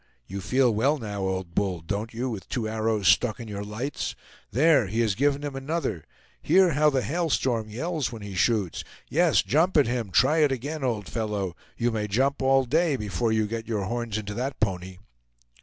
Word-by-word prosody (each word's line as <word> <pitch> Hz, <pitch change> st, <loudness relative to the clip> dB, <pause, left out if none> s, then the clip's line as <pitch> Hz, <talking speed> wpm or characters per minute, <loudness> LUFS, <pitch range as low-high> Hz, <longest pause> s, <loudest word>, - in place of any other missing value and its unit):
You 100 Hz, +8 st, -6 dB
feel 125 Hz, +6 st, +2 dB
well, 135 Hz, +8 st, +2 dB
now, 105 Hz, -5 st, -5 dB
old 95 Hz, -2 st, -3 dB
bull, 95 Hz, -1 st, 0 dB
don't 100 Hz, +7 st, -3 dB
you, 120 Hz, +3 st, -3 dB
with 105 Hz, -7 st, -6 dB
two 115 Hz, -4 st, -2 dB
arrows 110 Hz, -2 st, 0 dB
stuck 110 Hz, +5 st, +3 dB
in 115 Hz, -, -7 dB
your 100 Hz, -1 st, -5 dB
lights? 110 Hz, +8 st, -4 dB, 0.3 s
There, 140 Hz, -2 st, +4 dB
he 110 Hz, +5 st, -2 dB
has 110 Hz, -3 st, +2 dB
given 145 Hz, +5 st, +1 dB
him 145 Hz, -2 st, -4 dB
another! 135 Hz, -, -3 dB, 0.4 s
Hear 180 Hz, +2 st, +4 dB
how 150 Hz, +1 st, +4 dB
the 135 Hz, -3 st, 0 dB
Hail 165 Hz, -, -1 dB
Storm 115 Hz, -6 st, 0 dB
yells 155 Hz, +6 st, -2 dB
when 115 Hz, -3 st, -8 dB
he 100 Hz, -1 st, -7 dB
shoots! 100 Hz, -2 st, +1 dB, 0.3 s
Yes, 165 Hz, 0 st, +4 dB
jump 160 Hz, +4 st, +2 dB
at 145 Hz, -, +6 dB
him; 120 Hz, -3 st, -2 dB
try 155 Hz, -, +4 dB
it 150 Hz, -3 st, +4 dB
again, 140 Hz, +4 st, -3 dB
old 115 Hz, -6 st, -1 dB
fellow! 105 Hz, -6 st, -3 dB, 0.2 s
You 120 Hz, 0 st, +1 dB
may 105 Hz, -2 st, -2 dB
jump 135 Hz, +8 st, +1 dB
all 135 Hz, 0 st, +4 dB
day 155 Hz, +4 st, +2 dB
before 105 Hz, -1 st, -1 dB
you 110 Hz, -1 st, +2 dB
get 115 Hz, +1 st, -5 dB
your 110 Hz, -4 st, -1 dB
horns 115 Hz, +1 st, -2 dB
into 105 Hz, -1 st, -5 dB
that 130 Hz, +5 st, -3 dB
pony!" 95 Hz, -3 st, -2 dB
115 Hz, 200 wpm, -26 LUFS, 105-140 Hz, 0.4 s, at